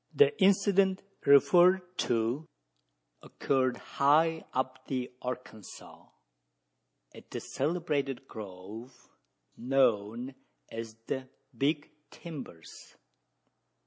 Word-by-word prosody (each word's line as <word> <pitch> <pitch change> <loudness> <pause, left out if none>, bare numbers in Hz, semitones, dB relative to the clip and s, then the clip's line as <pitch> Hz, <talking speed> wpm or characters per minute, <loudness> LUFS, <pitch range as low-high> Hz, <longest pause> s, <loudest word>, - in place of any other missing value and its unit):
The 435 - +5
incident 195 0 +4 0.2
referred 180 +6 +5
to 120 +6 0 0.7
occurred 130 -3 0
high 160 +3 +2
up 130 0 -3
the 130 -2 -3
Arkansas, 125 -4 -8 1.1
at - - -14
the - - -4
celebrated 140 -4 -2
grove 105 +3 -9 0.6
known 120 -1 +1 0.4
as 115 -1 -6
the 130 -1 -4 0.3
"Big 145 +4 0 0.2
Timbers." 135 - -10
135 Hz, 80 wpm, -30 LUFS, 120-165 Hz, 1.1 s, The